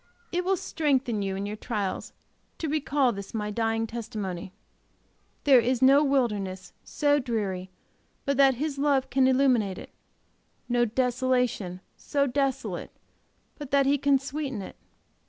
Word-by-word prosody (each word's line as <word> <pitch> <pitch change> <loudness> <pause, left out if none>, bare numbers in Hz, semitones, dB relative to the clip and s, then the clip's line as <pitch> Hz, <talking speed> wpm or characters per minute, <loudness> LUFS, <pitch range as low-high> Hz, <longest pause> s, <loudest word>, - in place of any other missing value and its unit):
It 355 +1 0
will 380 +1 +1
strengthen 265 -10 0
you 195 -1 -2
in 195 +1 -3
your 205 +1 -4
trials 210 -3 -3 0.5
to 320 - -3
recall 285 -3 +1
this 200 0 -7
my 210 -1 -2
dying 225 +1 0
testimony. 210 -6 -5 0.9
There 270 -3 +7
is 245 +1 +1
no 275 +3 +6
wilderness 210 -10 -1
so 290 0 +1
dreary 205 -7 -3 0.6
but 280 - +1
that 270 -2 +5
His 285 +2 -3
love 280 -3 +1
can 260 +1 +4
illuminate 255 -8 +2
it, - - -10 0.8
no 240 0 +2
desolation 250 -6 0 0.2
so 280 -1 0
desolate 270 0 -2 0.7
but 290 -3 -7
that 275 0 +3
He 280 +1 +3
can 280 0 +4
sweeten 270 -5 -4
it. - - -10
255 Hz, 140 wpm, -27 LUFS, 210-280 Hz, 0.9 s, There